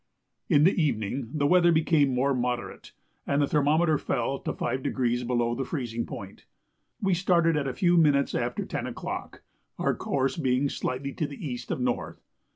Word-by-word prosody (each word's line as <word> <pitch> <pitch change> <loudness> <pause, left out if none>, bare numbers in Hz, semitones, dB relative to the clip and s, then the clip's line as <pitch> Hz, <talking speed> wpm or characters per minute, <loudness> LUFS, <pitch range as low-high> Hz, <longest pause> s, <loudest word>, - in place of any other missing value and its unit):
In 145 - +5
the 185 - +5
evening 115 -3 -1
the 145 -1 0
weather 175 +2 +5
became 160 -3 +3
more 130 +2 +1
moderate, 125 -1 -3 0.4
and 140 - +1
the 145 - +4
thermometer 150 +2 +2
fell 135 +2 -1
to - - -3
5° 125 -2 -1
below 120 -1 +1
the 135 - -2
freezing 120 -5 -4
point. 100 -1 -9 0.5
We 195 -2 +1
started 170 -2 +3
at 145 -2 0
a 130 - -2
few 175 -1 +3
minutes 145 -4 +3
after - - -2
10 - - -4
o'clock, - - -6 0.3
our - - +1
course 135 +2 -1
being 135 -2 +1
slightly 135 +2 -3
to 155 - -2
the 145 +2 -7
east 125 -2 -6
of - - -2
north. 125 -1 -2
140 Hz, 170 wpm, -27 LUFS, 125-155 Hz, 0.5 s, In